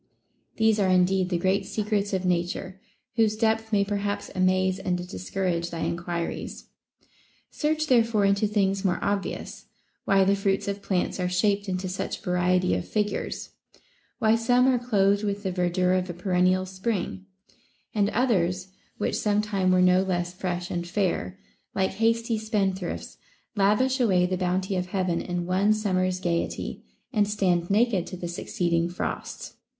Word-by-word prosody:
* - - -45
These 220 -1 +3
are 195 -2 +2
indeed 185 0 +3
the 175 - +1
great 190 +3 +1
secrets 205 -1 -1
of 190 -2 -1
Nature, 180 +2 -2 0.4
whose 220 -2 +3
depth 225 0 +1
may 200 -2 +3
perhaps 205 0 -2
amaze 185 0 +2
and 180 -2 -2
discourage 170 - -2
thy 165 -1 -5
enquiries. 170 0 -4 0.8
Search 310 +1 0
therefore 230 -6 +3
into 200 +2 +3
things 195 -2 +1
more 185 -3 +1
obvious, 200 -1 -3 0.2
— - - -46
why 195 -1 +4
the 195 +1 +3
fruits 195 0 0
of 200 0 -3
plants 190 -1 -1
are 180 0 0
shaped 200 +2 +1
into 185 0 -2
such 185 +1 -4
variety 180 - +2
of 90 -1 -2
figures; 210 -1 -2 0.7
why 220 -2 +3
some 245 +2 +3
are 255 -2 +3
clothed 205 -4 +2
with 205 0 -2
the 190 - -1
verdure 180 0 +1
of 185 0 -1
a 175 - -5
perennial 185 +1 +2
spring, 190 0 -3 0.7
and 205 -2 +2
others, 185 -7 +1 0.3
which - - -1
sometime 205 -3 +1
were 185 0 +4
no 180 0 +5
less 175 -2 -1
fresh 180 -1 -3
and 175 0 -3
fair, 175 - -1 0.4
like 190 0 +1
hasty 225 +2 +1
spendthrifts, 195 -4 -2 0.4
lavish 210 +7 +2
away 190 -7 +3
the 185 +1 -1
bounty 185 +1 -1
of 180 0 -1
Heaven 180 -2 -1
in 175 -1 -3
one 190 +4 +3
summers 185 -3 0
gayety, 170 -2 -2 0.3
and 210 -3 +3
stand 180 -4 +1
naked 205 -3 +2
to 185 - -7
the 175 - -5
succeed 170 0 -2
ing 170 +1 +2
frosts. 175 - -5
190 Hz, 160 wpm, -26 LUFS, 180-210 Hz, 0.8 s, no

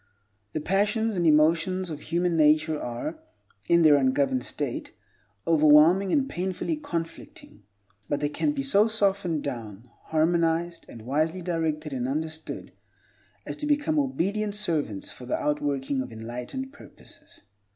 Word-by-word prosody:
The 155 - -2
passions 210 +5 +1
and 175 -2 +1
emotions 165 +4 +3
of 150 -1 -6
human 175 +1 0
nature 155 0 +3
are, 215 - -5 0.5
in 170 0 +5
their 150 -2 +7
ungoverned 130 -1 +1
state, - - -4 0.5
overwhelming 160 +4 +5
and 275 -2 +2
painfully 190 - -2
conflicting, 170 - -7 0.5
but 145 - 0
they 145 - 0
can 295 - 0
be 280 -2 -3
so 215 -6 +4
softened 195 -7 0
down, 115 -4 -6
harmonized, 165 +1 0
and 115 - -11
wisely 155 +8 -1
directed 160 -3 -2
and 125 -1 -2
understood, 160 +3 -5 0.7
as - - -5
to 300 -1 -4
become 295 +1 +2
obedient 215 - -1
servants 155 - -1
for 125 - -11
the - - 0
outworking 140 -2 -1
of 130 - -7
enlightened 120 - -6
purposes. - - -15
160 Hz, 135 wpm, -26 LUFS, 145-195 Hz, 0.7 s, their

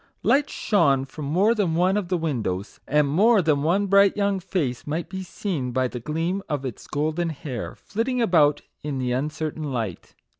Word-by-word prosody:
Lights 285 +1 +3
shone 140 -10 +2
from 145 +2 -8
more 185 +10 +3
than 195 -8 0
one 180 +3 +3
of 205 -4 -1
the 180 0 0
windows; 115 - -3
and 150 0 +3
more 205 +10 +4
than 155 -5 +2
one 180 +7 +2
bright 200 +1 +4
young 200 -1 +1
face 150 -10 -2
might 160 +3 -3
be 190 0 -5
seen, 175 -8 -3
by 130 +1 +1
the 125 - -6
gleam 165 - -2
of 145 -2 -2
its 125 -5 -6
golden 155 +3 -1
hair, 135 -6 -6
flit 225 +4 -3
ting 250 -1 0
about 160 -10 +3 0.2
in 145 -2 -3
the 125 -1 -1
uncertain 150 +2 -3
light. 110 -9 -4
155 Hz, 190 wpm, -24 LUFS, 140-190 Hz, 0.2 s, more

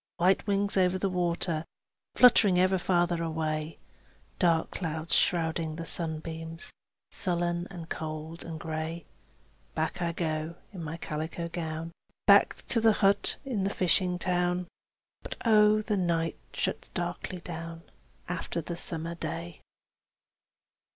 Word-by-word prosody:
White 185 +4 +3
wings 200 0 +1
over 185 0 +3
the 195 0 0
water, 170 -2 0 0.5
Fluttering 215 -6 +7
ever 185 +1 +4
farther 175 -1 +2
away; 155 -1 -2 0.6
Dark 165 -2 +3
clouds 160 -2 -2
shrouding 160 -2 +1
the 165 +1 -5
sunbeams, 165 0 -4 0.4
Sullen 175 -1 -1
and 175 -4 -8
cold 160 +1 -5
and 160 -1 -6
gray. 160 0 -4 0.7
Back - - -1
I 170 -1 +1
go 160 -1 -2 0.2
in 180 -4 -6
my 160 +1 -4
calico 160 +2 -4
gown, 165 -1 -4 0.3
Back - - +5
to 230 - +3
the 225 -1 +6
hut 200 +1 +3
in 235 -8 -1
the 195 - +1
fishing 180 -1 +2
town. 180 0 0 0.6
And - - -6
oh, 210 -1 +6
but 215 0 -1
the 210 -3 +1
night 165 -3 0
shuts - - -2
darkly 175 +1 -3
down 165 -1 -7 0.4
After 175 -1 -3
the 170 +1 -5
summer 165 0 -2
day! 165 0 -5
170 Hz, 130 wpm, -29 LUFS, 160-180 Hz, 0.7 s, Fluttering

